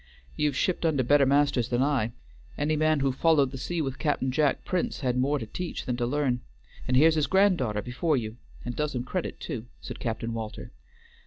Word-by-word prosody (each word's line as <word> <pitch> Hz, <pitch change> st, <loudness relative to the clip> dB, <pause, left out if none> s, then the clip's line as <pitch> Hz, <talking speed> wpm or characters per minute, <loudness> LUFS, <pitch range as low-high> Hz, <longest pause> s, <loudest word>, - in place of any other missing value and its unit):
"You've 150 Hz, -2 st, 0 dB
shipped 180 Hz, +4 st, 0 dB
under 150 Hz, -5 st, +2 dB
better 140 Hz, +2 st, +4 dB
masters 140 Hz, -3 st, +2 dB
than 125 Hz, +1 st, +2 dB
I. 135 Hz, -6 st, +1 dB, 0.5 s
Any 150 Hz, +1 st, +1 dB
man 155 Hz, -1 st, +2 dB
who 135 Hz, -1 st, +2 dB
followed 140 Hz, -1 st, +3 dB
the 135 Hz, -, -6 dB
sea 165 Hz, +4 st, -2 dB
with 135 Hz, -1 st, -4 dB
Cap'n 145 Hz, -4 st, 0 dB
Jack 145 Hz, +1 st, +1 dB
Prince 180 Hz, -4 st, -1 dB
had 125 Hz, -3 st, 0 dB
more 135 Hz, +4 st, +2 dB
to 115 Hz, -, -5 dB
teach 175 Hz, +11 st, -5 dB
than 125 Hz, -, -1 dB
to 120 Hz, -1 st, 0 dB
learn. 130 Hz, -2 st, 0 dB, 0.5 s
And 130 Hz, -, +3 dB
here's 160 Hz, +4 st, +6 dB
his 155 Hz, -3 st, +1 dB
grand 190 Hz, +1 st, +4 dB
daughter 105 Hz, -5 st, -1 dB
before 140 Hz, +5 st, 0 dB
you, 110 Hz, -1 st, -4 dB, 0.3 s
and 120 Hz, -1 st, -4 dB
does 150 Hz, -2 st, -2 dB
him 125 Hz, -, -1 dB
credit 175 Hz, +7 st, -4 dB
too," 115 Hz, -1 st, -5 dB
said -, -, -8 dB
Captain 115 Hz, 0 st, -3 dB
Walter. 110 Hz, -1 st, -6 dB
135 Hz, 210 wpm, -27 LUFS, 125-150 Hz, 0.5 s, here's